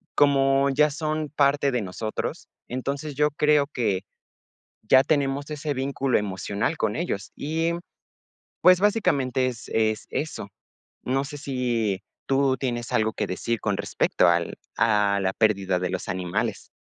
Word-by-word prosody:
como 135 -1 +4
ya 150 +3 +4
son 155 +1 -2
parte 140 -1 +2
de 125 -2 0
nosotros, 105 +3 -4 0.2
entonces, 140 +4 -4
yo 150 +1 +3
creo 150 0 +3
que 110 -9 -1 0.8
ya 130 +5 +5
tenemos 140 -1 0
ese 150 -1 -3
vínculo 135 -1 0
emocional 100 +7 -2
con 110 -6 -1
ellos. 110 - -3
Y, 160 +3 -1
mm, 170 - -3 0.8
pues, 180 +1 +6
básicamente, 140 - +2
es-es 110 -3 -1
eso. 150 -9 -4 0.6
No 135 +2 0
sé 145 +1 -7
si, 120 -8 -1 0.3
tú 135 -1 +2
tienes 120 -3 -3
algo 110 0 +2
que 105 - -2
decir 115 +5 -2
con 100 -2 -1
respecto - - +1
al - - 0 0.2
a 105 -3 +3
la 95 0 0
pérdida 100 -4 +1
de 90 0 -2
los 95 0 -4
animales. 90 -1 -2
130 Hz, 145 wpm, -25 LUFS, 110-145 Hz, 0.8 s, pues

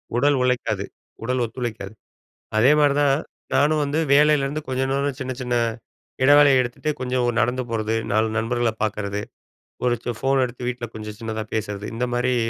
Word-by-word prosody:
உடல் 140 +3 +3
உழைக்காது. 125 -1 0 0.4
உடல் 125 +1 0
ஒத்துழைக்காது. 110 -3 -5 0.6
அதே 120 +6 +6
மாரி 145 -2 +4
தான், 140 -2 +4 0.4
நானும் 150 +1 +3
வந்து 145 +3 -1
வேலையிலேருந்து 150 0 +3
கொஞ்சம் 130 0 -1
நேரம், 140 -1 -1
சின்ன 130 -1 -3
சின்ன 125 -1 -2 0.7
இடவேலய 145 -1 +7
எடுத்துட்டு, 120 +5 -3
கொஞ்ச 125 0 -3
ஒ - - +3
நடந்து 125 +3 0
போறது. 110 -1 -1 0.2
4 110 +1 +2
நண்பர்கள 120 +1 0
பாக்குறது. 105 -1 -2 0.6
ஒரு 120 -1 +3
சோ 120 - 0
ஃபோன் 135 0 +2
எடுத்து, 125 0 -6
வீட்ல 125 -1 -4
கொஞ்ச 105 -1 -6
சின்னதா 110 -1 -4
பேசுறது. 105 -1 -3
இந்த 125 +2 -1
மாரி, 125 +1 +1
125 Hz, 160 wpm, -23 LUFS, 115-135 Hz, 0.7 s, இடவேலய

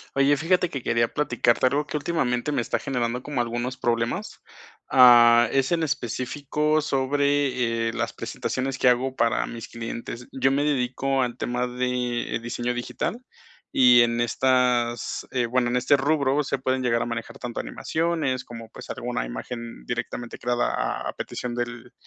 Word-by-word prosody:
Oye, 140 +1 +4
fíjate 180 +4 +1
que 135 -5 -5
quería 115 0 +2
platicarte 130 -3 +2
algo 145 +2 0
que - - -5
últimamente 145 -4 -1
me 140 -4 0
está - - -1
generando 125 -1 -2
como 145 -3 -3
algunos 120 +2 -2
problemas. 115 0 -2 0.5
Ah, 120 -2 +7
es 135 +1 +1
en 165 -1 +1
específico 145 +3 -1
sobre, 135 -4 +1
eh, 115 - -2
las - - -2
presentaciones 130 0 -3
que 125 - +4
hago 130 +2 +1
para 115 -2 +1
mis 115 -1 -8
clientes. 115 +1 -6
Yo 135 0 +2
me 140 +2 +1
dedico 135 -1 0
al 120 -1 -2
tema 125 0 -1
de 125 -1 -2
diseño 120 +1 -2
digital, 120 - -3 0.5
y 125 -2 +7
en 120 0 +2
estas, 120 -1 +1
eh, 125 -2 +1
bueno, 120 +1 +1
en 125 - +1
este 125 +4 +4
rubro 140 0 +1
se 140 - -2
pueden 130 0 0
llegar 115 -2 +1
a - - -1
manejar 115 -1 -5
tanto 120 -1 -4
animaciones 160 -6 -1
como, 115 -1 -9
pues, - - -12
alguna - - -3
imagen - - -7
directamente 120 - -4
creada 120 0 0
a - - -2
a - - -4
petición 120 -1 -5
del 120 0 -5
125 Hz, 165 wpm, -25 LUFS, 120-135 Hz, 0.5 s, Ah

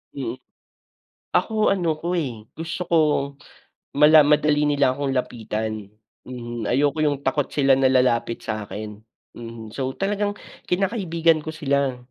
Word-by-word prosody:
Mm, - - -4 1.0
ako 215 -1 +1
ano 170 -5 +1
ko, 175 +2 -2
eh, 120 -10 -4
gusto 165 +3 -5
ko 170 - +2 1.0
mala 150 +1 +8
madali 150 0 +3
nila 145 -3 +2
akong 140 -1 -1
lapitan. 110 -4 -3 0.3
Mhm, 120 -3 -6
ayoko 145 +4 +1
yung 145 -2 0
takot 135 +1 0
sila 135 -2 +4
na 135 -1 +3
lalapit 125 -3 +2
sakin, 105 -1 -5 0.4
mhm, 115 -2 -9
so 130 +1 -3
talagang 205 +1 -1 0.3
kinakaibigan 180 -4 +1
ko - - -7
sila 140 -3 0
140 Hz, 130 wpm, -23 LUFS, 120-160 Hz, 1.0 s, mala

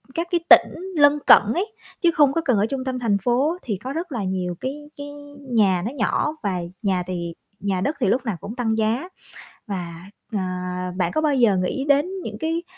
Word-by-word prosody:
các 335 +1 -1
cái 350 - +3
tỉnh 375 +3 +5
lân 290 -1 +5
cận - - +8
ấy, 410 +4 -2 0.3
chứ 345 - +4
không 290 -4 +4
có 330 - +1
cần 250 -7 +3
ở 200 - +3
trung 265 +1 -3
tâm 260 -1 -2
thành 220 -5 +2
phố 255 - +1
thì 210 -6 -2
có 255 +8 -6
rất 335 +2 -4
là 235 -6 -2
nhiều 185 -2 -2
cái 295 +3 -5
cái 285 0 -6 0.3
nhà 215 -9 +2
nó 230 - -2
nhỏ 280 +3 0
và 195 -3 0 0.2
nhà 190 -3 +1
thì 170 -2 -4 0.3
nhà 195 -2 -1
đất 285 +10 0
thì - - +1
lúc 245 +6 +2
nào 215 -6 -2
cũng 200 +6 -7
tăng 225 -3 0
giá. 225 +9 0 0.6
Và, 175 -4 -5 0.3
ờ, 210 - -1 0.6
bạn 185 - 0
có 310 - 0
bao 300 -2 +2
giờ 230 -7 +4
nghĩ 185 +9 -1
đến 285 0 +4 0.2
những - - -6
cái 330 +1 -1
245 Hz, 215 wpm, -23 LUFS, 200-295 Hz, 0.6 s, cận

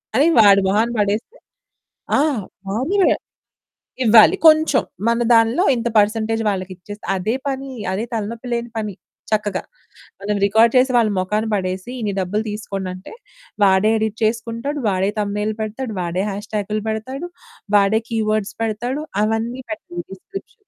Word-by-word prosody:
అని. 285 +5 +5
వాడు 200 -1 +6
మొహాన 220 +4 +2
పడేస్తే, 210 - -1 0.8
ఆ! - - +4 0.5
వానివే, 320 - +2 0.9
ఇవ్వాలి. 225 - +7
కొంచెం 310 -3 +5 0.3
మన 235 +1 +1
దాంట్లో 230 +10 +3
ఇంత 235 0 -2
పర్సెంటేజ్ 225 +2 +1
వాళ్ళకి 185 -1 -4
ఇచ్చేస్తే 205 +3 -10
అదే 215 +5 -1
పని. 270 0 -3 0.2
అదే 210 +4 -2
తలనొప్పి 230 +3 -4
లేని 235 0 -3
పని. 210 -4 -4 0.4
చక్కగా 210 -3 0 0.6
మనం 205 +1 -1
రికార్డ్ 220 +3 +5
చేసి 255 +1 +4
వాళ్ళ 225 -2 +3
మొఖాన్ని 210 +4 -1
పడేసి, 185 +3 -2
ఇన్ని 210 -3 -2
డబ్బులు 205 +4 -1
తీసుకోండంటే 195 - -6 0.5
వాడే 190 +2 +4
ఎడిట్ 220 0 -2
చేసుకుంటాడు. 230 +6 -1
వాడే 190 +1 +1
థంబ్నెయిల్ 210 +1 -1
పెడతాడు. 220 +2 -4
వాడే 175 +2 -1
హ్యాష్‌ట్యాగ్లు 210 +1 -3
పెడతాడు. 260 +10 -4 0.5
వాడే 200 +2 +3
కీవర్డ్స్ 215 -2 -1
పెడతాడు. 240 +7 -2 0.2
అవన్నీ 225 +4 -1
పెడతాడు. 350 +2 -6
డిస్క్రిప్షన్. 395 - -11
220 Hz, 130 wpm, -20 LUFS, 205-240 Hz, 0.9 s, ఇవ్వాలి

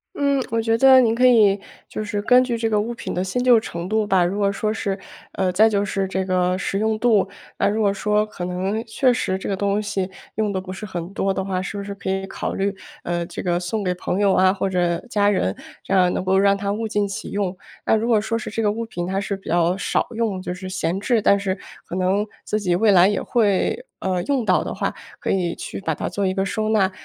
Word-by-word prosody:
嗯， 280 -2 +1
我 230 0 +1
觉 225 0 +1
得 265 +1 +7
您 230 -2 +3
可 250 +2 +3
以 215 -5 +6 0.3
就 215 - -5
是 205 -1 -3
根 250 +4 +5
据 245 -2 -2
这 225 0 0
个 210 -1 +2
物 235 +3 -3
品 235 - -6
的 180 - -1
新 190 +6 -2
旧 250 -1 +6
程 175 -5 -4
度 215 +1 +1
吧， 190 -3 +3
如 190 +4 -2
果 200 -1 +2
说 215 +2 -1
是 200 -3 -3 0.3
呃， 190 -1 0
再 215 +4 +5
就 205 -1 +1
是 195 -1 -1
这 190 0 -2
个 180 -1 +1
实 195 +1 -2
用 220 0 0
度。 220 -5 +3 0.3
那 - - +2
如 215 +2 0
果 200 -2 +3
说 210 +1 +1
可 210 -4 -8
能 190 +5 -2
确 250 +3 +2
实 190 -6 -1
这 - - -6
个 195 - 0
东 200 +2 0
西 195 -3 -2 0.3
用 215 -1 0
得 190 - -1
不 185 0 -7
是 215 +3 -7
很 180 -1 -6
多 195 -1 0
的 190 - -3
话， 185 -1 -1
是 185 - -5
不 200 - -4
是 200 0 -6
可 195 - -5
以 195 0 -1
考 - - -4
虑， 195 +1 -1 0.3
呃， 175 0 -2
这 170 - -6
个 175 -1 0
送 185 +3 -3
给 180 - +1
朋 180 +1 -3
友 200 -2 +3
啊， 185 0 +4
或 195 0 -1
者 175 -2 +1
家 205 -2 +3
人， 100 - 0 0.3
这 - - -4
样 180 -2 +4
能 - - -2
够 190 +1 +3
让 200 0 +4
它 200 0 -2
物 220 +1 -3
尽 205 -1 0
其 195 - -6
用。 195 -2 -2 0.3
那 - - +4
如 220 +1 0
果 220 - +4
说 225 +2 -1
是 220 - -5
这 225 - -2
个 210 - +2
物 230 +2 -2
品 175 -5 -5
它 190 +1 -1
是 200 -1 -3
比 195 - -17
较 175 +2 +2
少 - - 0
用， 220 -5 -2
就 180 - -4
是 185 +1 -8
闲 185 -1 -2
置， 230 +1 +1
但 200 0 +4
是 195 -1 -2 0.3
可 - - -5
能 190 +3 +1 0.2
自 215 - -1
己 180 -4 +1
未 215 +3 +4
来 185 -1 +6
也 205 -1 0
会， 225 - +1
呃， 185 -1 -1
用 275 -4 +1
到 185 -4 +3
的 - - -4
话， - - -2 0.3
可 - - -1
以 180 -3 0
去 - - -6
把 160 -5 -2
它 - - -3
做 200 -1 -1
一 185 - 0
个 195 0 0
收 215 +2 -2
纳。 205 -3 +2
200 Hz, 280 characters per minute, -22 LUFS, 185-220 Hz, 0.3 s, 得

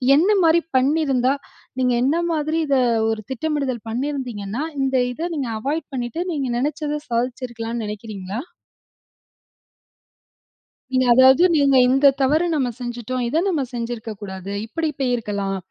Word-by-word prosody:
என்ன 375 +8 +4
மாரி 330 +1 +5 0.2
பண்ணியிருந்தா, 270 -2 +2 0.5
நீங்க 250 -1 +2
என்ன 275 +5 +2 0.2
மாதிரி 310 +1 0
இதை 275 -2 +3 0.3
ஒரு 220 -1 -2
திட்டமிடுதல் 270 -4 -2
பண்ணியிருந்தீங்கன்னா, 245 -3 -3 0.2
இந்த 265 0 0 0.2
இதை 330 +7 -3
நீங்க 270 -6 -2
அவாய்ட் 290 +8 -2
பண்ணிட்டு 245 +6 -3
நீங்க 280 -4 -2
நெனைச்சதை 295 +3 -2
சாதிச்சுருக்கலாம்ன்னு 235 -1 -3
நெனைக்கிறீங்களா? 210 0 -6 2.5
நீங்க 255 0 +3
அதாவது, 260 +6 +6
நீங்க 280 -2 +4
இந்த 270 +2 +5
தவறு 300 +6 +3
நம்ம 260 -4 +1
செஞ்சுட்டோம். 245 +1 -4
இத 280 +7 0
நம்ம 315 -6 0
செஞ்சிருக்கக்கூடாது. 215 -5 -5
இப்டி 320 +7 -2
போயிருக்கலாம் 210 -6 -1
255 Hz, 120 wpm, -21 LUFS, 230-290 Hz, 2.5 s, அதாவது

